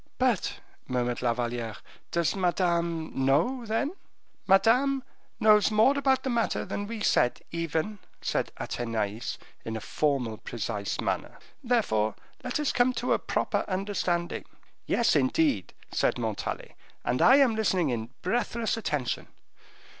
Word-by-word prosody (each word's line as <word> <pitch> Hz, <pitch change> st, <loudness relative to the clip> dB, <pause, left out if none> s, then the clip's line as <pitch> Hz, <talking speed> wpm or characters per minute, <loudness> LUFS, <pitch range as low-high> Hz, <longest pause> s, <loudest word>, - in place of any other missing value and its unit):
"But," -, -, +1 dB, 0.3 s
murmured 125 Hz, -1 st, -1 dB
La 120 Hz, -1 st, +2 dB
Valliere, 120 Hz, -2 st, -3 dB, 0.3 s
"does 170 Hz, +1 st, +1 dB
Madame 170 Hz, -3 st, 0 dB
know, 180 Hz, -, +2 dB
then 225 Hz, +7 st, 0 dB, 0.3 s
" -, -, -41 dB
"Madame 250 Hz, +8 st, +4 dB, 0.4 s
knows 215 Hz, -2 st, +6 dB
more 220 Hz, +6 st, +4 dB
about 265 Hz, -2 st, +2 dB
the 265 Hz, -, -1 dB
matter 235 Hz, -1 st, 0 dB
than 205 Hz, -, -4 dB
we 225 Hz, -1 st, -5 dB
said, 125 Hz, -10 st, +3 dB
even," 165 Hz, +5 st, -2 dB, 0.2 s
said -, -, -1 dB
Athenais, 110 Hz, -2 st, -2 dB, 0.3 s
in 110 Hz, 0 st, -4 dB
a -, -, -4 dB
formal, 125 Hz, 0 st, 0 dB
precise 105 Hz, -3 st, -4 dB
manner. -, -, -2 dB, 0.3 s
"Therefore 110 Hz, -, +1 dB, 0.3 s
let 250 Hz, +3 st, -2 dB
us 300 Hz, -, +1 dB
come 250 Hz, +1 st, +3 dB
to 240 Hz, +1 st, 0 dB
a -, -, +1 dB
proper -, -, 0 dB
understanding." 185 Hz, -3 st, -1 dB, 0.4 s
"Yes, 235 Hz, -, +3 dB
indeed," 290 Hz, +2 st, +2 dB, 0.2 s
said -, -, +1 dB
Montalais, -, -, -3 dB, 0.3 s
"and -, -, +1 dB
I 265 Hz, -, +8 dB
am 270 Hz, -5 st, +5 dB
listening 190 Hz, -7 st, +2 dB
in 115 Hz, -1 st, -3 dB
breathless 230 Hz, +3 st, 0 dB
attention." 150 Hz, -, -2 dB
190 Hz, 135 wpm, -28 LUFS, -, 0.4 s, I